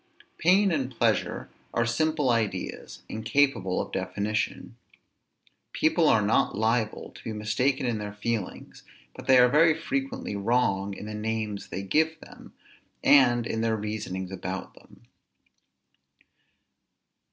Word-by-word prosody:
Pain 190 Hz, +4 st, +4 dB
and 135 Hz, -6 st, -1 dB
pleasure 120 Hz, -, 0 dB, 0.3 s
are 115 Hz, -, +2 dB
simple 145 Hz, +3 st, +1 dB
ideas, 115 Hz, -3 st, -3 dB
incapable 110 Hz, -4 st, +1 dB
of -, -, -4 dB
definition. 105 Hz, +5 st, -3 dB, 1.0 s
People -, -, +2 dB
are -, -, +4 dB
not -, -, +1 dB
liable 110 Hz, 0 st, 0 dB
to -, -, -15 dB
be 110 Hz, -, -4 dB
mistaken 125 Hz, +6 st, 0 dB
in 115 Hz, -3 st, -1 dB
their 105 Hz, 0 st, -5 dB
feelings, 105 Hz, -2 st, -4 dB, 0.3 s
but -, -, -11 dB
they 130 Hz, -, +7 dB
are 125 Hz, 0 st, +7 dB
very 155 Hz, +4 st, +4 dB
frequently 135 Hz, -8 st, -3 dB
wrong 100 Hz, -2 st, 0 dB
in -, -, -8 dB
the 105 Hz, -, -6 dB
names 105 Hz, -1 st, -3 dB
they 95 Hz, -, -5 dB
give 160 Hz, +9 st, +1 dB
them, -, -, -14 dB, 0.5 s
and 120 Hz, -4 st, +5 dB
in 110 Hz, -1 st, -2 dB
their 115 Hz, -1 st, +1 dB
reasonings 100 Hz, -3 st, -4 dB
about 95 Hz, 0 st, -5 dB
them. -, -, -20 dB
115 Hz, 130 wpm, -27 LUFS, 105-135 Hz, 1.0 s, they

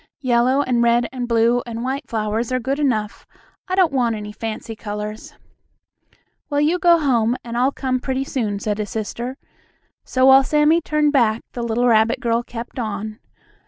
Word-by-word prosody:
Yellow, 255 Hz, +2 st, +2 dB
and 250 Hz, -3 st, +1 dB
red, 235 Hz, 0 st, +3 dB
and 250 Hz, -2 st, -4 dB
blue, 235 Hz, +1 st, +2 dB
and 230 Hz, 0 st, -5 dB
white 265 Hz, +1 st, -4 dB
flowers 220 Hz, +2 st, -2 dB
are 255 Hz, -, +1 dB
good 270 Hz, +4 st, -2 dB
enough. 225 Hz, -7 st, -1 dB, 0.4 s
I 370 Hz, -, -1 dB
don't 365 Hz, -6 st, +3 dB
want 240 Hz, -4 st, +1 dB
any 210 Hz, -1 st, -6 dB
fancy 225 Hz, +1 st, -6 dB
colors." 210 Hz, 0 st, -6 dB, 1.1 s
"Well, 290 Hz, -1 st, 0 dB
you 315 Hz, +5 st, +2 dB
go 345 Hz, -1 st, +5 dB
home 245 Hz, -6 st, +1 dB
and 235 Hz, -1 st, -6 dB
I'll 255 Hz, +3 st, +2 dB
come 260 Hz, -2 st, -2 dB
pretty 265 Hz, +1 st, -2 dB
soon," 225 Hz, -7 st, -2 dB
said 210 Hz, +1 st, -3 dB
his 210 Hz, -1 st, -3 dB
sister, 235 Hz, +4 st, -5 dB, 0.7 s
so 255 Hz, 0 st, +1 dB
while 270 Hz, 0 st, +7 dB
Sammie 300 Hz, +4 st, +3 dB
turned 300 Hz, -1 st, +1 dB
back, 230 Hz, -4 st, +2 dB
the 240 Hz, -, -5 dB
little 235 Hz, +1 st, 0 dB
rabbit 225 Hz, 0 st, +3 dB
girl 235 Hz, -2 st, 0 dB
kept 240 Hz, +1 st, -8 dB
on. 215 Hz, -1 st, -4 dB
240 Hz, 175 wpm, -20 LUFS, 225-270 Hz, 1.1 s, while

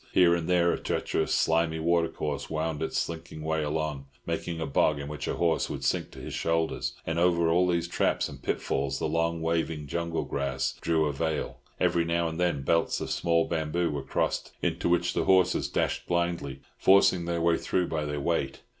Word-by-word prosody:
Here 90 Hz, -2 st, +6 dB
and 85 Hz, -1 st, -1 dB
there 85 Hz, -1 st, +4 dB
a -, -, -3 dB
treacherous, 80 Hz, -, -1 dB
slimy 80 Hz, 0 st, +2 dB
watercourse 80 Hz, -3 st, -1 dB
wound 80 Hz, -1 st, -2 dB
its 80 Hz, -, -2 dB
slinking 80 Hz, -2 st, -4 dB
way 80 Hz, 0 st, 0 dB
along, 75 Hz, -2 st, -2 dB, 0.2 s
making 85 Hz, -1 st, -3 dB
a 80 Hz, -, -2 dB
bog 75 Hz, +1 st, +2 dB
in 70 Hz, 0 st, -5 dB
which 75 Hz, -1 st, -5 dB
a -, -, -1 dB
horse 85 Hz, -2 st, +1 dB
would -, -, -5 dB
sink -, -, 0 dB
to -, -, -12 dB
his -, -, -7 dB
shoulders; 80 Hz, 0 st, -1 dB
and 80 Hz, +1 st, -1 dB
over 85 Hz, -1 st, +3 dB
all 90 Hz, +2 st, +3 dB
these 85 Hz, -1 st, 0 dB
traps -, -, +1 dB
and 70 Hz, -2 st, -11 dB
pitfalls 70 Hz, 0 st, -1 dB
the -, -, -1 dB
long 85 Hz, 0 st, 0 dB
waving 80 Hz, -2 st, -1 dB
jungle 85 Hz, +3 st, -2 dB
grass 70 Hz, 0 st, -2 dB
drew 80 Hz, -2 st, +2 dB
a 75 Hz, -, -1 dB
veil. 80 Hz, +2 st, -2 dB, 0.2 s
Every 85 Hz, -, +2 dB
now 85 Hz, 0 st, 0 dB
and 80 Hz, +1 st, -5 dB
then 90 Hz, -6 st, +1 dB
belts 85 Hz, +4 st, +1 dB
of -, -, -4 dB
small 85 Hz, -1 st, +2 dB
bamboo 80 Hz, +1 st, -1 dB
were 70 Hz, -1 st, -3 dB
crossed, -, -, -2 dB
into -, -, -1 dB
which 90 Hz, 0 st, +2 dB
the -, -, 0 dB
horses 95 Hz, -1 st, +3 dB
dashed -, -, -1 dB
blindly, 85 Hz, -6 st, -1 dB, 0.2 s
forcing 95 Hz, -2 st, +5 dB
their 85 Hz, 0 st, -1 dB
way 85 Hz, 0 st, +2 dB
through 90 Hz, -1 st, 0 dB
by 75 Hz, -2 st, -2 dB
their 75 Hz, 0 st, -3 dB
weight. 70 Hz, -3 st, -1 dB
80 Hz, 200 wpm, -28 LUFS, 75-85 Hz, 0.2 s, Here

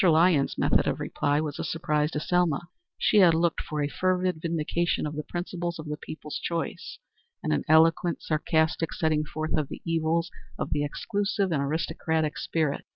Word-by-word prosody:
Lyons's 160 Hz, -3 st, +4 dB
method -, -, +2 dB
of -, -, 0 dB
reply 145 Hz, +1 st, 0 dB
was 150 Hz, -2 st, -3 dB
a -, -, -1 dB
surprise 150 Hz, -2 st, 0 dB
to 150 Hz, -, -3 dB
Selma. 175 Hz, -2 st, +1 dB, 0.4 s
She 215 Hz, -, +3 dB
had 175 Hz, -5 st, +7 dB
looked 170 Hz, 0 st, +1 dB
for 150 Hz, -1 st, -3 dB
a -, -, +1 dB
fervid 185 Hz, 0 st, 0 dB
vindication 170 Hz, +1 st, 0 dB
of 150 Hz, 0 st, -4 dB
the 150 Hz, -, -2 dB
principle 175 Hz, +1 st, -4 dB
of 155 Hz, -, -7 dB
the 150 Hz, -, -2 dB
people's 150 Hz, 0 st, -7 dB
choice, 170 Hz, -1 st, -4 dB, 0.5 s
and -, -, +1 dB
an -, -, 0 dB
eloquent, 165 Hz, +2 st, +4 dB
sarcastic 160 Hz, +1 st, +1 dB
setting 155 Hz, -2 st, +1 dB
forth 155 Hz, +1 st, -3 dB
of 150 Hz, -3 st, -1 dB
the -, -, -8 dB
evils 165 Hz, +1 st, 0 dB, 0.3 s
of -, -, -3 dB
the 145 Hz, 0 st, +1 dB
exclusive 200 Hz, +4 st, -1 dB
and 150 Hz, -4 st, +1 dB
aristocratic 160 Hz, +1 st, -1 dB
spirit. 155 Hz, -4 st, -1 dB
160 Hz, 175 wpm, -27 LUFS, 150-170 Hz, 0.5 s, had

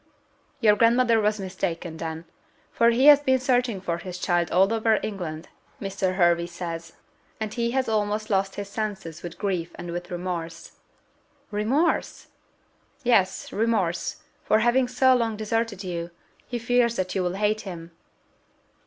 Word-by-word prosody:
"Your 210 Hz, -3 st, +6 dB
grandmother 230 Hz, +1 st, +4 dB
was 210 Hz, 0 st, +1 dB
mistaken, 175 Hz, -3 st, -4 dB
then; 160 Hz, 0 st, -5 dB, 0.5 s
for 235 Hz, 0 st, +4 dB
he 240 Hz, +3 st, +3 dB
has 295 Hz, -1 st, +9 dB
been 260 Hz, -2 st, +2 dB
searching 250 Hz, -5 st, +1 dB
for 170 Hz, -2 st, -3 dB
his 180 Hz, 0 st, -7 dB
child 175 Hz, -2 st, 0 dB
all 190 Hz, +5 st, +3 dB
over 225 Hz, -1 st, +2 dB
England, 170 Hz, -6 st, -5 dB, 0.3 s
Mr. 195 Hz, -2 st, -2 dB
Hervey 170 Hz, -2 st, +3 dB
says; 170 Hz, -1 st, -6 dB, 0.5 s
and 215 Hz, -1 st, -3 dB
he 235 Hz, -1 st, 0 dB
has 260 Hz, -1 st, +1 dB
almost 215 Hz, 0 st, -1 dB
lost 195 Hz, 0 st, +1 dB
his 205 Hz, -1 st, -5 dB
senses 200 Hz, -6 st, -5 dB
with 175 Hz, -1 st, -8 dB
grief 185 Hz, -5 st, -2 dB
and 175 Hz, -1 st, -7 dB
with 175 Hz, +1 st, -5 dB
remorse!" 175 Hz, -2 st, -5 dB, 0.7 s
"Remorse!" 235 Hz, +11 st, 0 dB, 0.7 s
"Yes, 195 Hz, -6 st, +2 dB
remorse, 205 Hz, -6 st, -1 dB, 0.2 s
for 215 Hz, -, +3 dB
having 240 Hz, +3 st, +3 dB
so 260 Hz, +1 st, +4 dB
long 230 Hz, -3 st, 0 dB
deserted 220 Hz, -2 st, -2 dB
you: 170 Hz, -2 st, -4 dB, 0.4 s
he 245 Hz, -, -3 dB
fears 240 Hz, 0 st, +2 dB
that 185 Hz, -3 st, -2 dB
you 190 Hz, -, 0 dB
will 180 Hz, 0 st, -1 dB
hate 210 Hz, +2 st, +1 dB
him." 170 Hz, -3 st, -8 dB
200 Hz, 150 wpm, -25 LUFS, 175-230 Hz, 0.7 s, has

